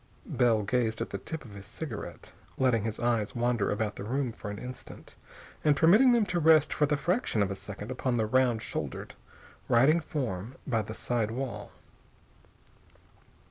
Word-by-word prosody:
Bell 115 -3 +2
gazed 115 +1 0
at - - -4
the - - -4
tip 160 -4 -6
of 110 - -11
his 100 0 -9
cigarette, 125 -4 -7 0.3
letting 120 -5 +2
his 110 -1 -3
eyes 120 -3 0
wander 120 -2 +1
about 105 0 -2
the - - -5
room 130 +3 -1
for 105 - -8
an 105 - -5
instant, 125 +3 -9 0.5
and 150 -2 +4
permitting 210 - +6
them 235 -3 +4
to 180 -2 -1
rest 155 -2 +5
for 150 - +2
the 150 0 +1
fraction 175 - +1
of 100 - -2
a - - -3
second 105 +3 -7
upon 130 -1 -1
the 110 - +1
round 120 0 +2
shouldered, - - -5 0.6
writing 135 +8 +5
form 125 - -4
by 115 -5 +1
the 110 +1 -7
side 115 -3 -1
wall. 130 +2 -5
120 Hz, 175 wpm, -29 LUFS, 110-145 Hz, 0.6 s, permitting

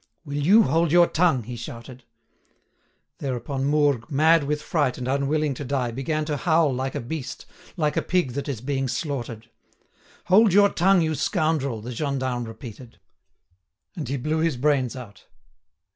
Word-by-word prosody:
"Will 145 -1 -4
you 210 +8 +6
hold 165 0 +1
your 175 +1 +6
tongue?" 165 -8 +1
he 120 +3 -7
shouted. 120 +1 -9 1.1
Thereupon 135 0 -3
Mourgue, 145 -5 +1
mad 155 +2 +4
with 150 +1 -1
fright 150 -4 0
and 125 - -5
unwilling 140 +2 0
to 140 - -6
die, 130 -3 -1
began 155 +5 -2
to 150 -1 -2
howl 160 -2 +2
like 130 +1 -3
a - - -1
beast—like 150 +3 -5
a - - +1
pig 175 -8 0
that 140 +3 -4
is 125 -6 -4
being 135 0 -1
slaughtered. 120 -6 -4 0.7
"Hold 195 +2 +5
your 200 +1 +6
tongue, 190 +1 +3
you 160 -1 0
scoundrel!" 155 - -1
the 120 +3 -7
gendarme 130 -2 -2
repeated. 115 +1 -10 1.0
And 155 -9 -5
he 140 - -1
blew 155 +5 -1
his 160 -5 0
brains 135 -2 +1
out. 120 -6 -11
140 Hz, 160 wpm, -24 LUFS, 125-155 Hz, 1.1 s, you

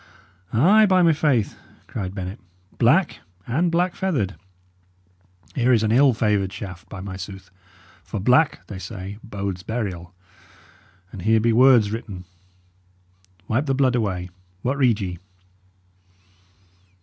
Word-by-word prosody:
"Ay, 200 - +5
by 185 -2 +4
my 165 -1 +5
faith!" 140 -8 0 0.3
cried 95 -3 -5
Bennet. 95 +2 -5 0.4
"Black, - - +3 0.3
and 165 +8 0
black 175 +2 +1
feathered. 140 - -1 1.2
Here 125 -1 +2
is 115 -3 +4
an 110 - +1
ill 135 +3 +5
favoured 105 -4 +1
shaft, 95 -3 -9
by 95 - -8
my 95 -1 -6
sooth! 95 0 -9 0.5
for 105 - -5
black, 125 +10 +2
they 95 - -8
say, 95 +1 -7
bodes 100 -4 -5
burial. 95 -6 -4 1.0
And 95 - -8
here 110 +4 +3
be 115 +1 +2
words 120 -4 +5
written. 105 -5 -6 1.2
Wipe 130 +7 0
the 135 - +1
blood 130 -2 +2
away. 95 -6 -2 0.3
What 130 +3 0
read 120 -5 +3
ye?" 90 -3 -4
110 Hz, 130 wpm, -23 LUFS, 95-130 Hz, 1.2 s, Ay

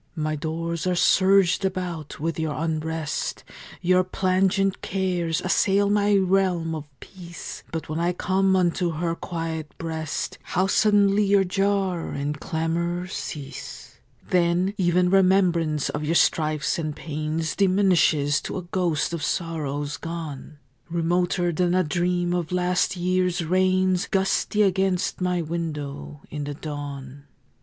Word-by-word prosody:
My 155 -1 -1
doors 165 +3 -3
are 180 - +1
surged 190 +1 +4
about 180 -6 -3
with 165 +2 -2
your 155 -2 -1
unrest; 160 -1 -3 0.4
Your 185 +1 +4
plangent 190 +1 +1
cares 180 -4 -1
assail 200 +2 +2
my 205 0 +3
realm 185 -4 +2
of 155 -2 -6
peace; 175 -3 -9
But 165 -1 -4
when 155 +1 -3
I 170 +1 +1
come 190 +1 +1
unto 175 -1 +1
her 165 +2 -1
quiet 165 -3 -5
breast 160 -2 -4
How 185 +1 0
suddenly 205 0 +3
your 200 0 +4
jar 195 -2 0
and 145 +1 -3
clamor 170 +3 -2
cease! 145 -6 -7 0.3
Then 180 +2 +2
even 180 -1 +2
remembrance 180 -6 +3
of 150 - -3
your 160 +3 0
strifes 155 +1 +2
and 155 -2 -3
pains 155 +1 -3
Diminishes 180 -7 +3
to - - -5
a 185 - -4
ghost 170 -4 -1
of 170 - -3
sorrows 145 -3 -2
gone, 155 -3 -7 0.3
Remoter 175 +1 +1
than 175 +2 +1
a 185 - +3
dream 175 +2 0
of 175 -2 -2
last 180 +1 +1
year's 180 -1 0
rains 185 +2 +2
Gusty 195 +2 +1
against 190 -1 0
my 180 -1 0
window 150 -3 -5
in 150 -1 -4
the 145 0 -5
dawn. 145 -2 -7
175 Hz, 130 wpm, -24 LUFS, 160-185 Hz, 0.4 s, surged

